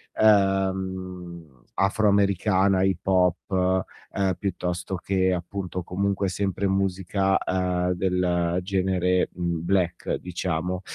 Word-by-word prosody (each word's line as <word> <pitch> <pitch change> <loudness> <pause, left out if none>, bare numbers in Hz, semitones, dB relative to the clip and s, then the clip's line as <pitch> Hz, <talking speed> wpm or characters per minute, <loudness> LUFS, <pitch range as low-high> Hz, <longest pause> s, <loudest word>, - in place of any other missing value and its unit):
ehm, 95 - 0
afroamericana, 100 -1 +2
hip 95 -1 0
hop, 95 0 +2 0.3
ehm, 95 -2 0
piuttosto 90 -1 -3
che 95 +1 +1
appunto 90 +1 -4
comunque 100 +2 -1
sempre 95 +1 -1
musica, 95 0 +1
ehm, 90 -1 0
del 90 -1 0
genere, 90 -1 +1
mhmm, 85 -2 -3
black, 90 -2 0
diciamo. 90 0 -3
95 Hz, 95 wpm, -25 LUFS, 90-95 Hz, 0.3 s, afroamericana